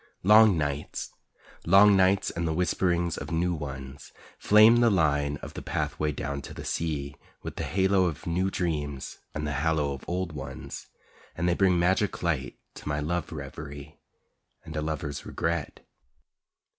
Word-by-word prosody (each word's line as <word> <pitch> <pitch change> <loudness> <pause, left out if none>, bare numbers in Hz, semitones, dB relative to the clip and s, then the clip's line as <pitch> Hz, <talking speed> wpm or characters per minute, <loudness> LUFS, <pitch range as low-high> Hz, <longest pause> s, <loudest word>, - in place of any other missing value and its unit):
Long 105 -1 +7
nights, 70 -1 -3 0.5
long 100 +3 +6
nights 95 +1 +3
and 85 0 -2
the 80 - 0
whisperings 85 -1 0
of - - -7
new 85 +2 0
ones, 70 -3 -7 0.3
Flame 110 +3 +7
the 120 -1 +5
line 75 -6 +1
of - - -7
the - - -6
pathway 75 0 -2
down 70 0 -4
to - - -10
the - - -8
sea 75 -3 -2 0.3
With - - -6
the - - -2
halo 95 0 +2
of 80 -5 -3
new 90 +3 0
dreams 75 -7 -3 0.2
and 75 0 -2
the 75 - -2
hallow 80 -3 +1
of 70 - -9
old 90 0 -2
ones, 65 -3 -8 0.5
And 85 +2 0
they 85 - +3
bring 95 -1 +3
magic 95 +4 +1
light 75 -8 -1 0.2
to - - -10
my 75 0 -1
love 85 +5 -2
reverie 70 0 -8 0.7
And 80 - -8
a 75 - -1
lover's 75 -2 -4
regret. 85 +1 -3
80 Hz, 160 wpm, -27 LUFS, 75-90 Hz, 0.7 s, Long